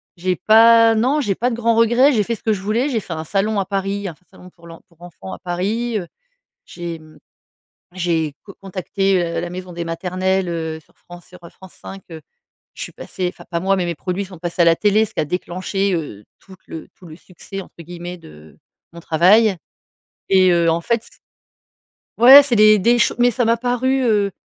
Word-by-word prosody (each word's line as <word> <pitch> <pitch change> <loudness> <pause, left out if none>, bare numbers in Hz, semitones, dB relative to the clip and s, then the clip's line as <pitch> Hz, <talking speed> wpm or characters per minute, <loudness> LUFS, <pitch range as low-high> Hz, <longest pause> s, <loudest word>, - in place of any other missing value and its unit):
j'ai 180 +1 -1
pas 225 +3 +5
non 255 +7 +1
j'ai 205 -8 -1
pas 245 +5 -1
de 230 - -3
grand 230 -1 +1
regret, 240 +5 +4
j'ai 215 -4 +1
fait 235 - -3
ce - - -18
que 220 - 0
je 190 - -5
voulais, 225 +7 -1
j'ai 235 -5 -1
fait 180 - -7
un 160 0 -6
salon 200 +4 -1
à 195 - -1
Paris, 195 +1 -3
un 170 - -7
f 180 - -34
salon 180 - -15
pour 170 -1 -21
l'en 165 0 -13
pour 170 -1 -29
enfant 155 - -11
à - - -8
Paris, 210 +6 -3
heu. 175 - -8 0.6
J'ai 170 -2 -7
mmh, 155 -1 -18 0.7
j'ai 170 -4 -1
co 200 - -13
contacté, 195 0 -1
heu, 170 -1 -3
la 175 - -5
maison 180 0 -8
des 170 - -4
maternelles, 185 +2 -2
heu, 160 -1 -4
sur - - -31
France 175 0 -15
sur 180 - -15
France 190 -2 -16
5 195 0 -11
heu. 160 -1 -9 0.5
Je - - -8
suis - - -6
passée, 180 -1 -5
enfin, - - -15
pas 170 -1 -2
moi, 195 +2 +1
mais 185 - -1
mes 170 - -3
produits 185 +4 -4
sont 185 -2 -13
passés 175 +1 -1
à - - +3
la 165 - +5
télé, 210 +3 +2
ce - - -16
qui - - -1
a - - 0
déclenché, 185 +3 -3
heu, 125 - -6 0.2
toute 190 -2 -16
le 160 - -9
tout 180 - -15
le 155 - -11
«succès», 190 +2 -10
entre - - -19
guillemets, 175 +1 -8
de 75 - -16 0.3
mon 170 - -11
travail 185 +6 +3 0.7
et 185 -1 +4
heu, 170 -1 +2
en 165 +1 0
fait 230 +4 -1
c - - -17 1.1
ouais, 265 +4 +10
c'est 255 -5 -1
les 215 0 +6
des 240 +4 +3
ch - - +2
mais, 245 0 +4
ça 245 +1 -1
m'a 230 +1 +3
paru, 250 +2 0
heu, 205 -3 +1
190 Hz, 225 wpm, -19 LUFS, 170-220 Hz, 1.1 s, ouais